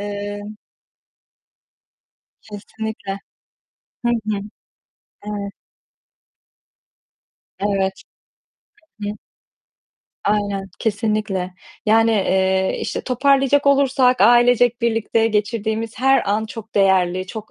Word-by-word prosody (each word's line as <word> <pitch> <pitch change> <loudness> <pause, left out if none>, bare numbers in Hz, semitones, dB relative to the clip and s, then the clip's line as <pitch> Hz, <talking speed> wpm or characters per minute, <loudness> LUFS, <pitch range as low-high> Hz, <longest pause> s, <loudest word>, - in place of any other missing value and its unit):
eee 205 0 -5 2.0
Kesinlikle! 210 -1 -6 0.9
Hı 240 - +3
hı. 205 -2 -1 0.9
Evet. 200 -1 -5 2.1
Evet. 195 -1 -1 1.0
Hı 205 - -2
hı. 210 - -5 1.1
Aynen, 200 -1 0
kesinlikle! 210 -4 -1 0.3
Yani, 225 +1 +4
eee, 190 -2 +1
işte, - - -3
toparlayacak 275 +2 +2
olursak 270 -2 +3
ailecek 245 0 +5
birlikte 225 -1 +1
geçirdiğimiz 220 +1 -2
her 270 +1 +4
an 215 +2 +1
çok 220 0 -10
değerli, 185 -2 +2
çok 215 +3 -8
215 Hz, 80 wpm, -20 LUFS, 200-235 Hz, 2.1 s, ailecek